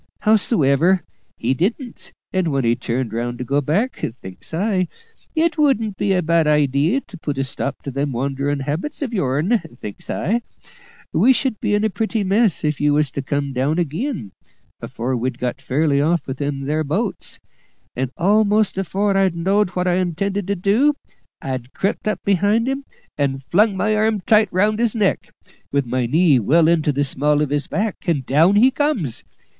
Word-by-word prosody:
Hows'ever, 185 - +3 0.3
he 125 +3 0
didn't, 225 - -3 0.2
and 185 -2 +1
when 135 -4 0
he 115 +1 +3
turned 120 -1 -3
round 120 +1 -3
to 125 - -4
go 140 +3 0
back, 195 - -1 0.2
thinks 95 -1 -11
I, 185 +1 0 0.5
`It 330 0 +1
wouldn't 225 -9 +2
be 200 - 0
a 180 -1 +1
bad 165 -1 +2
idee 150 - +2
to 190 - -13
put 145 -3 -3
a 135 - +1
stop 135 +1 -4
to 140 - -5
them 140 +2 -2
wanderin' 140 +3 -2
habits 160 - -3
of 250 -4 -4
yourn,' 175 - +1 0.2
thinks 105 - -8
I; 225 +9 0 0.7
`we 260 +1 +5
should 255 -6 -1
be 205 - +1
in 210 - +1
a 220 - +1
pretty 220 0 -1
mess 200 0 +2
if 150 -1 -1
you 145 0 +3
was 150 -3 +1
to 140 - -3
come 140 0 -2
down 135 +5 0
ag'in, 175 - -3 0.5
afore 125 +3 -3
we'd 125 +1 -2
got 125 -1 -3
fairly 140 +1 +1
off 160 0 +1
with 130 -1 -6
them 140 -1 -2
there 150 +3 -1
boats;' 190 +8 -2 0.6
and 130 +1 -1
almost 205 +1 +2
afore 195 +1 0
I 195 -1 +4
knowed 190 +4 +1
what 180 0 0
I 180 0 +2
intended 190 +2 -1
to 200 - 0
do, 215 +11 +2 0.5
I'd 130 -2 -5
crept 200 +2 -2
up 215 - -2
behind 205 +4 +2
him 270 +1 -2 0.3
and 135 -1 -1
flung 200 +7 +2
my 215 +3 +1
arm 215 -1 +1
tight 215 +2 +4
round 210 +4 +1
his 235 -1 +1
neck, 205 -4 0 0.4
with 140 -1 +1
my 125 0 -1
knee 155 0 +4
well 155 +9 +3
into 160 -3 +2
the 145 +1 0
small 145 +2 +1
of 145 - -3
his 145 0 0
back, 210 0 -2
and 145 -7 0
down 160 +10 +4
he 245 +6 +5
comes. 265 - -1
170 Hz, 185 wpm, -20 LUFS, 140-210 Hz, 0.7 s, `we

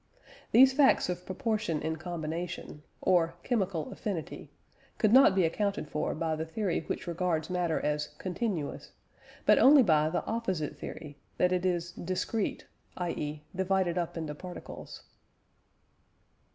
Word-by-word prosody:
These 265 +3 +7
facts 270 -8 +4
of 180 0 -4
proportion 215 - -1
in 160 0 -2
combination, 165 -2 -5 0.2
or 170 -2 +3
"chemical 190 - -1
affinity," 190 -7 -5 0.5
could 215 0 +3
not 260 -7 +7
be 190 - +4
accounted 200 +1 -1
for 150 - -2
by 160 0 -1
the 155 - -3
theory 175 +3 -1
which - - -3
regards 170 -2 -1
matter 175 -3 0
as 150 0 -1
"continuous," 185 -4 -3 0.5
but - - +6
only 280 0 +8
by 155 -5 +3
the 175 - -2
opposite 190 -10 -2
theory 145 -3 -8 0.2
that 180 - +3
it 185 0 +1
is 175 -1 -1
"discrete" 185 +5 -2 0.3
(i.e. 150 -4 -3
divided 190 -1 +1
up 170 -1 -3
into 155 -2 -4
particles). 180 +4 -9
175 Hz, 135 wpm, -30 LUFS, 160-195 Hz, 0.5 s, only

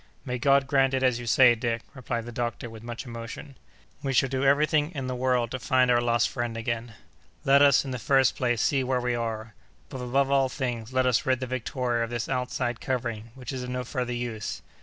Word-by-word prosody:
"May 125 0 -3
God 140 +1 +4
grant 135 -1 +2
it 130 - 0
as 125 -2 +2
you 120 - -7
say, 120 +1 +6
Dick!" 115 0 -2
replied 120 -3 -4
the 120 - -7
doctor, 120 0 -4
with 110 -1 -10
much 120 +2 -7
emotion. 115 +3 -8 0.5
"We 135 -1 -2
shall 135 +1 +3
do 130 0 -1
everything 150 +2 +3
in 135 -2 -3
the 130 - -3
world 125 -2 +1
to 130 - -3
find 125 +1 +3
our 120 0 +4
lost 120 -1 +2
friend 120 -2 -3
again. 115 0 -3 0.5
Let 140 +1 +6
us, 140 -1 +5
in 135 - -4
the 125 - -3
first 135 +3 +3
place, 120 -3 0
see 135 -2 +2
where 130 0 0
we 125 0 -1
are. 115 -2 -3 0.4
But, 130 - -6
above 135 +2 +1
all 135 -1 +3
things, 120 -4 -4
let 130 0 +2
us 125 0 +2
rid 130 -1 +2
the 130 - -3
Victoria 125 -1 -1
of 115 - -4
this 120 -1 -3
outside 125 -1 -2
covering, 115 -4 -3
which 130 0 -7
is 130 - -4
of 125 - -5
no 125 0 -2
further 125 0 -3
use. 120 -3 -4
125 Hz, 225 wpm, -27 LUFS, 120-130 Hz, 0.5 s, say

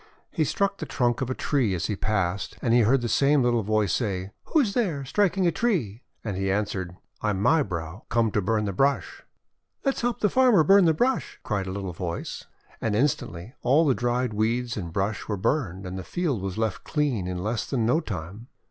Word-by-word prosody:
He 160 - +1
struck 200 +5 0
the - - -5
trunk 120 -1 0
of 130 - -1
a 130 - -1
tree 125 -10 +1
as 85 - -2
he 105 - -1
passed, 95 -2 -1
and 115 - +1
he 120 - +6
heard 120 +4 +4
the 120 - -1
same 140 +3 +3
little 120 -1 +2
voice 105 -3 +1
say: 95 -5 -2
— - - -51
"Who 315 - +3
is 210 -7 0
there, 170 - 0
striking 195 +5 +1
a 170 - +4
tree?' 150 - -1 0.2
And 105 -4 -3
he 95 +1 -1
answered, 95 -3 -2 0.2
:<I 105 - 0
am 95 -2 -1
My 155 +7 +4
brow 85 - -5
come 115 -2 +2
to 105 - +1
burn 105 +2 0
the 100 - -2
brush." 135 +8 0 0.6
"Let 275 - +3
us - - -6
help 240 -2 -1
the 210 - +4
farmer 250 -10 +5
burn 195 +4 +6
the 160 -1 +4
brush 255 +7 0
I9' - - -39
cried 100 -3 -1
the - - -3
little 95 -2 -4
voice. 85 0 -5 0.4
And 110 -2 0
instantly 110 - -1
all 140 +7 +4
the 140 - +4
dried 120 -1 -1
weeds 115 +3 0
and 85 -6 -5
brush 100 +4 -2
were 105 - -2
burned, 95 - -1
and 95 +1 -5
the - - -6
field 140 - -2
was 95 0 -4
left 110 -3 -1
clean 140 - -1
in 90 0 -3
less 110 +2 -2
than 120 -5 0
no 125 +8 +3
time. 100 - -6
115 Hz, 230 wpm, -26 LUFS, 95-145 Hz, 0.6 s, he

